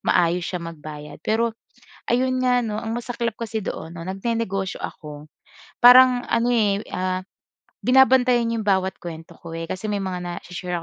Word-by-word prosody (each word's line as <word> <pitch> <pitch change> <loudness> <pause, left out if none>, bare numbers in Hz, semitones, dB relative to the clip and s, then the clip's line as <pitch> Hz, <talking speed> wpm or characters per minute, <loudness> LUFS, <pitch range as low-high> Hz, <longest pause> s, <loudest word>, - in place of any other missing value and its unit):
maayos 175 +1 +2
siya 180 - -3
magbayad. 150 -2 -9
Pero 225 +1 0 0.6
ayun 255 +1 +1
nga 250 -1 +2
'no, 215 -2 -3
ang 225 0 -4
masaklap 235 -2 -3
kasi 225 -1 -4
doon 165 -4 -6
'no 170 0 -8
nag-ne-negosyo 195 -1 -2
ako. 150 -1 -8 0.5
Parang 250 0 +8
ano 235 +1 +2
eh, 210 -2 +1
ah 185 0 -2 0.5
binabantayan 250 -2 +4
'yong 220 -2 -3
bawat 190 -1 +1
kuwento 165 0 -9
ko 165 -1 -8
eh 165 - -4
kasi 185 +5 -5
may 205 -2 -1
mga 185 -1 -3
na-i-she-share 180 0 -5
205 Hz, 155 wpm, -23 LUFS, 175-235 Hz, 0.6 s, Parang